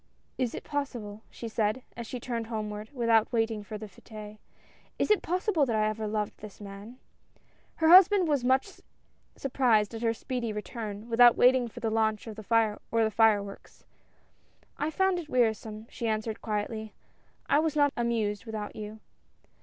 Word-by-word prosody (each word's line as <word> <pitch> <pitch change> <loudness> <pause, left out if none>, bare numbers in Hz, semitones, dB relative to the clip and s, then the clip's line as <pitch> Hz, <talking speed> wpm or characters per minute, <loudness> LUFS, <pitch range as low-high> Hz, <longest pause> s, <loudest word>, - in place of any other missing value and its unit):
" - - -45
Is 250 -3 -1
it - - -6
possible," 240 -8 -4
she 235 - -7
said, 220 +2 -1
as 235 -1 -6
she 255 - -5
turned 235 -2 -4
homeward, 215 -1 -5
without 230 -4 +2
waiting 225 -2 0
for 215 +1 -7
the 215 - -7
f^tes; 210 +1 -11 0.6
is - - +1
it 425 - +4
possible 365 -2 +1
that 230 - 0
I 215 0 +2
ever 215 0 -2
loved 210 -1 -3
this 210 -2 -11
man?" 205 +4 -10 0.8
Her 320 - +1
husband 370 +1 +8
was 285 -5 +1
much 265 +9 +1 0.5
surprised 235 -6 +2
at 225 - -6
her 230 -1 +1
speedy 245 -1 -3
return, 210 0 -6
without 240 0 +6
waiting 250 0 +5
for 230 - -10
the 225 - -1
launch 220 0 0
or 220 - -5
the 215 - -9
fire 220 -1 +2 0.6
works. 200 0 -12 0.9
"I 300 - -1
found 380 +2 +1
it 315 -3 -8
wearisome," 220 -4 0
she 235 - -4
answered 220 0 -2
quietly. 215 0 -3 0.5
"I 285 - +4
was 315 -1 0
not 290 -1 +3
amused 220 -4 -1
without 215 -2 -5
you." 215 0 -8
225 Hz, 170 wpm, -29 LUFS, 215-255 Hz, 0.9 s, husband